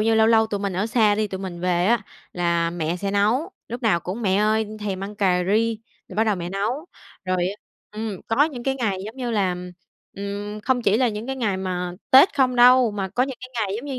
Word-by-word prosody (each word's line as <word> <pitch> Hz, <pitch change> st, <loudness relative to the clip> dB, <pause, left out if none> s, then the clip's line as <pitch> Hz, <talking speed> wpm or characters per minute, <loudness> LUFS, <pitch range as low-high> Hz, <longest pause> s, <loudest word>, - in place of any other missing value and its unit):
như 225 Hz, +1 st, +3 dB
lâu 220 Hz, 0 st, +5 dB
lâu 225 Hz, -1 st, +4 dB
tụi 205 Hz, -2 st, -3 dB
mình 200 Hz, -1 st, -2 dB
ở 190 Hz, +4 st, -1 dB
xa 220 Hz, -3 st, +3 dB
đi, 215 Hz, +1 st, 0 dB
tụi 190 Hz, -2 st, -6 dB
mình 185 Hz, -3 st, -6 dB
về 180 Hz, 0 st, +1 dB
á 235 Hz, 0 st, +3 dB, 0.3 s
là 170 Hz, -1 st, 0 dB
mẹ 170 Hz, 0 st, -2 dB
sẽ 195 Hz, +2 st, -3 dB
nấu, 220 Hz, -, +1 dB, 0.2 s
lúc 240 Hz, +2 st, -6 dB
nào 210 Hz, -7 st, +2 dB
cũng: 185 Hz, +8 st, -5 dB
"Mẹ 190 Hz, -2 st, +2 dB
ơi, 215 Hz, +1 st, +2 dB
thèm 195 Hz, -2 st, -3 dB
ăn 205 Hz, +1 st, -7 dB
cà 185 Hz, -3 st, +2 dB
ri." 220 Hz, +3 st, +1 dB, 0.3 s
Rồi -, -, -10 dB
bắt 220 Hz, -, +3 dB
đầu 210 Hz, -3 st, +1 dB
mẹ 175 Hz, 0 st, -5 dB
nấu. 225 Hz, -, -2 dB, 0.4 s
Rồi 185 Hz, 0 st, 0 dB
á 195 Hz, -, -5 dB, 0.4 s
ừm, 210 Hz, -3 st, -5 dB
có 245 Hz, +6 st, +4 dB
những 275 Hz, -6 st, -5 dB
cái 270 Hz, +1 st, 0 dB
ngày, 215 Hz, -7 st, -1 dB
giống 220 Hz, +4 st, -8 dB
như 250 Hz, -2 st, -3 dB
là 195 Hz, -5 st, 0 dB, 0.6 s
ừm, 205 Hz, +1 st, -5 dB
không 245 Hz, +2 st, 0 dB
chỉ 205 Hz, -1 st, +3 dB
là 250 Hz, +1 st, +3 dB
những 215 Hz, +1 st, -5 dB
cái 265 Hz, 0 st, -3 dB
ngày 215 Hz, -6 st, 0 dB
mà 180 Hz, -1 st, -3 dB, 0.2 s
Tết 280 Hz, +10 st, +7 dB
không 255 Hz, -2 st, +2 dB
đâu, 250 Hz, 0 st, +6 dB
mà 200 Hz, -2 st, -3 dB
có 225 Hz, +7 st, 0 dB
những 265 Hz, -1 st, -3 dB
cái 255 Hz, -, -9 dB
ngày 210 Hz, -4 st, -1 dB
giống 235 Hz, -, -7 dB
như 265 Hz, -3 st, -4 dB
210 Hz, 250 wpm, -23 LUFS, 190-240 Hz, 0.6 s, Tết